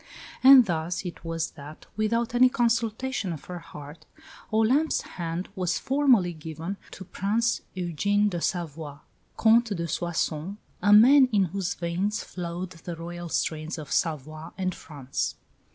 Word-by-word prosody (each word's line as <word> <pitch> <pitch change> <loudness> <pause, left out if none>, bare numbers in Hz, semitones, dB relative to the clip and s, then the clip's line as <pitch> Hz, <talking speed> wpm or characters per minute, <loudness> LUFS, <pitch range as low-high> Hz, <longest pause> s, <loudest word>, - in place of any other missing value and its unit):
And 265 -2 +9
thus 175 0 -2
it 175 - -7
was 165 -1 -3
that, 150 +2 -12
without 230 +2 0
any 250 +1 +6
consultation 235 -2 0
of 155 -4 -7
her 180 -1 -6
heart, 150 -1 -12 0.4
Olympe's 245 +9 +2
hand 170 +1 -5
was 180 -1 0
formally 260 -10 +3
given 160 +4 -6 0.2
to 190 - -9
Prince 220 +7 0
Eugene 195 +4 +1
de 175 -4 -3
Savoie, 160 -5 -3 0.4
Comte 225 -1 +4
de 170 0 -3
Soissons, 170 +2 -2 0.2
a 205 +3 +3
man 255 +5 +8
in 205 -3 +3
whose 185 0 -2
veins 185 +6 -2
flowed 175 +1 -6
the 170 0 -8
Royal 175 +1 -7
strains 160 +1 -2
of 150 -3 -8
Savoy 155 0 -2
and 185 -1 -1
France. 140 -5 -4
180 Hz, 140 wpm, -26 LUFS, 165-220 Hz, 0.4 s, And